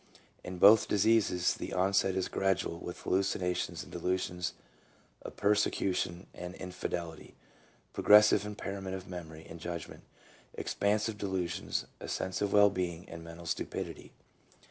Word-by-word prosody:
In 90 0 -6
both 105 +4 +7
diseases 100 -4 +3
the - - -6
onset 95 0 +2
is 95 -1 0
gradual 95 -3 0
with 90 - -7
hallucinations 90 -2 -1
and - - -14
delusions 90 -1 -2 0.7
of - - -9
persecution 100 -3 +1
and 90 +1 -7
in 90 -1 -7
fidelity, 85 -3 -5 0.6
progressive 105 -1 +6
impairment 100 -2 -5
of 95 -1 -8
memory 80 -3 -8
and 85 - -10
judgment, 85 -1 -6 0.5
expansive 105 +1 0
delusions, 95 -4 -2
a - - -7
sense 95 +1 -3
of 100 -1 0
well 100 0 +6
being 90 -1 -3
and 85 0 -8
mental 85 +1 -10
stupidity. - - -4
95 Hz, 130 wpm, -31 LUFS, 85-100 Hz, 0.7 s, both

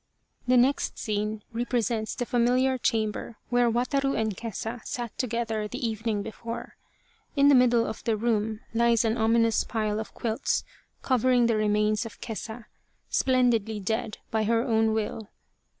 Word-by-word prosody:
The 250 0 +5
next 260 +3 +2
scene 210 0 -2
represents 230 -2 -1
the 245 - -2
familiar 250 +2 +2
chamber 220 0 -1
where 245 -1 +4
Wataru 275 +4 0
and 220 -2 -1
Kesa 225 +2 -5
sat 240 -3 -5
together 225 -3 -2
the 230 - -3
evening 220 -2 -2
before. 230 +2 -7 0.6
In 280 0 +5
the - - +7
middle 245 -3 +5
of 220 - -6
the 225 -2 +1
room 220 -1 0
lies 235 0 +3
an 225 0 +1
ominous 230 0 +3
pile 215 -2 -1
of 220 - -7
quilts 230 +3 -1 0.4
covering 250 -1 +3
the 230 -1 +2
remains 210 +1 +2
of 220 - -14
Kesa, 225 0 -6 0.5
splendidly 240 -5 +2
dead 220 +3 -2
by 220 -1 +1
her 230 +1 +2
own 220 -3 +2
will. 220 -1 -3
230 Hz, 150 wpm, -27 LUFS, 220-245 Hz, 0.6 s, the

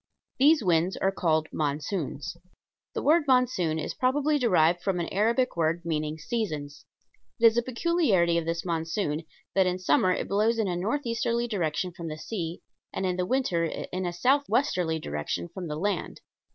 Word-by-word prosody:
These 295 0 +5
winds 175 0 +2
are 195 - +1
called 160 -4 +1
"monsoons." 150 +1 -3 0.6
The - - -2
word 315 +1 +4
monsoon 250 -11 +2
is 155 - -3
probably 290 +4 +1
derived 175 - +3
from 185 -1 -1
an 170 - -2
Arabic 235 +6 +1
word 170 +1 0
meaning 155 -1 -2
"seasons." 155 -6 -4 0.5
It 230 - +4
is 225 0 +7
a 240 - +3
peculiarity 235 - +2
of 165 - -5
this 165 +1 -2
monsoon 165 -1 -2 0.3
that 190 -1 +3
in 180 0 0
summer 185 +1 +3
it - - -1
blows 215 +3 +2
in 220 -3 +1
a 180 - -1
northeasterly 235 +3 -1
direction 180 -4 -1
from 170 -1 -8
the 155 -1 -5
sea 170 -1 -5 0.3
and 190 - -3
in 180 -1 0
the 180 0 -1
winter 250 -10 +1
in 180 +3 -4
a - - -1
southwesterly 190 - +1
direction 80 - -4
from 180 -2 -5
the 150 -1 -4
land. 195 +1 -2
180 Hz, 170 wpm, -27 LUFS, 160-230 Hz, 0.6 s, is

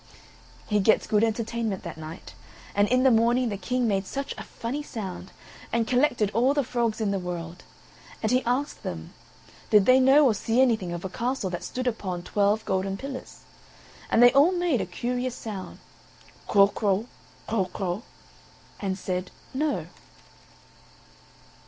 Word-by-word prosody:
He 210 -1 +1
gets 210 +2 +3
good 210 0 +2
entertainment 225 -2 -1
that 170 -3 -6
night; 160 +1 -9 0.4
and 205 0 +3
in 255 +2 +3
the 265 - +6
morning 235 +2 +3
the 205 - -3
King 250 +3 -1
made 195 -2 0
such 275 0 -4
a - - -7
funny 250 +6 -5
sound, 190 -9 -7 0.4
and 230 0 +1
collected 245 -5 +2
all 250 +6 +2
the 285 - +2
frogs 235 -3 -1
in 215 -3 0
the 195 - 0
world. 175 -1 -6 0.6
And 220 - +1
he 255 +1 +3
asked 255 +5 -1
them, 80 -2 -6 0.6
did 210 -2 +6
they 255 +1 +6
know 270 +3 +6
or 245 - +4
see 225 +4 0
anything 225 -9 +2
of 175 +1 -5
a - - -3
castle 235 -2 -2
that 175 0 -4
stood 255 +7 -4
upon 190 -7 -2
twelve 205 +3 +1
golden 195 +1 -1
pillars; 270 +3 -8 0.7
and 235 - +5
they 245 - +8
all 290 +7 +5
made 350 -8 +1
a - - -3
curious 250 0 -3
sound, 205 -4 -7 0.7
Kro 200 -1 +6
kro, 205 0 0 0.4
kro 215 -4 +1
kro, 185 +1 -3 0.8
and 190 -2 -2
said, 185 -1 -3 0.2
No. 295 +3 -1
220 Hz, 160 wpm, -26 LUFS, 195-250 Hz, 0.8 s, they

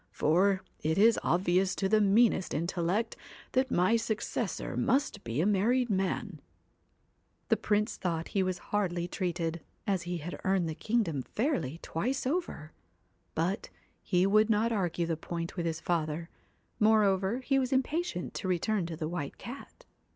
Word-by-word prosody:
For, 190 +5 +2 0.2
it 160 +3 0
is 225 +3 +5
obvious 185 +2 +2
to 195 - 0
the 215 +2 +4
meanest 205 -3 +3
in 160 +3 0
tellect 180 +5 0 0.4
that 260 0 +2
my 185 +2 +3
successor 225 -1 -2
must 270 -7 +1
be 115 +4 -3
a - - +2
married 225 +5 +2
man.' 190 -3 -1 1.1
The - - +4
Prince 210 +1 0
thought 165 -3 -2
he 195 - +1
was 185 -1 0 0.2
hardly 175 -4 0
treated, 170 -3 -2 0.2
as 195 -3 +1
he 175 0 -3
had 170 +3 -7
earned 190 -3 +2
the 160 - -2
kingdom 200 - 0
fairly 215 - -1
twice 255 +12 -2
over, 260 - -2 0.6
but 175 +5 -1 0.3
he 180 -1 +2
would 215 +3 +4
not 220 +2 +2
argue 175 -5 0
the 165 -1 -1
point 170 +1 -5
with 170 -3 -1
his 160 -1 -2
father, 165 0 -2 0.5
more 215 0 +5
over 195 +3 +1
he 270 +1 +2
was 255 -1 -1
impatient 270 - -1
to - - -4
return 185 +1 0
to 165 -2 -6
the 155 -1 -2
White 160 -4 -4
Cat. 280 - -10
190 Hz, 160 wpm, -30 LUFS, 170-220 Hz, 1.1 s, is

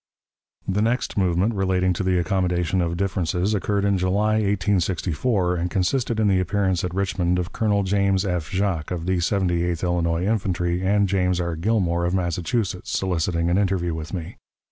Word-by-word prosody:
The 95 +2 0
next 120 +4 0
movement 95 +3 +1
relating 95 -2 +1
to 90 - -3
the 95 -1 +1
accommodation 90 -1 0
of 85 0 -1
differences 95 0 0
occurred 100 0 0
in 100 -2 +2
July, 100 +4 +1
1864, 95 -1 0
and 85 +1 -1
consisted 110 +6 0
in 110 - +3
the 95 -2 +3
appearance 95 -1 0
at 90 - -2
Richmond 95 -2 0
of 90 +1 -3
Colonel 105 -2 +1
James 100 0 +1
F. 90 -5 -2
Jacques, 95 -5 -1
of 85 -2 -4
the 95 0 +1
Seventy 90 -1 +1
eighth 85 -1 -2
Illinois 85 -1 0
Infantry, 90 -4 0
and 100 +1 +2
James 90 -2 +1
R. 85 -1 -2
Gilmore, 85 -2 0
of 90 +2 0
Massachusetts, 90 +2 -2
soliciting 85 -2 0
an 90 - +3
interview 90 -4 0
with 80 0 -6
me. 85 -4 -6
95 Hz, 170 wpm, -23 LUFS, 85-100 Hz, -, in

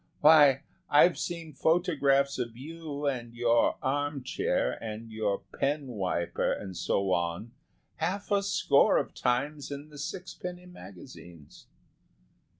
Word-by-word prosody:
Why, 145 -3 +7 0.3
I've 170 +4 +5
seen 165 -3 -5
photographs 140 -4 +2
of 120 -2 -4
you 150 +1 -6
and 120 -4 -2
your 120 0 +2
arm 145 0 -1
chair 130 - 0
and 110 +1 -6
your 105 -2 -2 0.2
pen 145 +1 0
wiper 95 -6 -1
and 95 -2 -5
so 95 +3 0
on, 85 +6 -2 0.5
half 190 +6 -3
a 200 -1 +3
score 200 0 +3
of - - -2
times 140 +4 -1
in 145 +1 -7
the 145 -1 -12
sixpenny 180 +2 -6
magazines." 90 - -13
140 Hz, 125 wpm, -29 LUFS, 115-155 Hz, 0.5 s, Why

